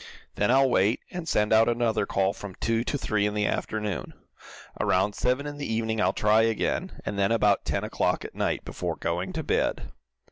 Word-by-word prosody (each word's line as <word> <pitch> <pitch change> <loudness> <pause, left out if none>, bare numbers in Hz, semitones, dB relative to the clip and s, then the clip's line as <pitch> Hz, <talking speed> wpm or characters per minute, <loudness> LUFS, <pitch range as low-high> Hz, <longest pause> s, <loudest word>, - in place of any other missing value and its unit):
Then 105 - 0
I'll 135 +2 +5
wait, 110 -2 +2
and 175 -2 -5
send 105 +1 +2
out 110 +1 +5
another 115 -2 0
call 95 0 +1
from 100 -3 -9
two 115 0 0
to 145 - -1
three 105 -5 0
in 105 - -3
the 105 -1 +1
afternoon. 105 -3 -3 0.6
Around 95 +3 +2
seven 125 +6 0
in 145 0 -6
the 140 - -3
evening 110 -1 -1
I'll 95 - +3
try 105 +2 +3
again, 115 -1 -1
and 100 - -3
then 100 +1 +2
about 105 -3 +2
ten - - -1
o'clock - - -1
at - - -8
night, - - -2
before - - -4
going - - -2
to - - -3
bed." - - -1
110 Hz, 200 wpm, -26 LUFS, 105-120 Hz, 0.6 s, I'll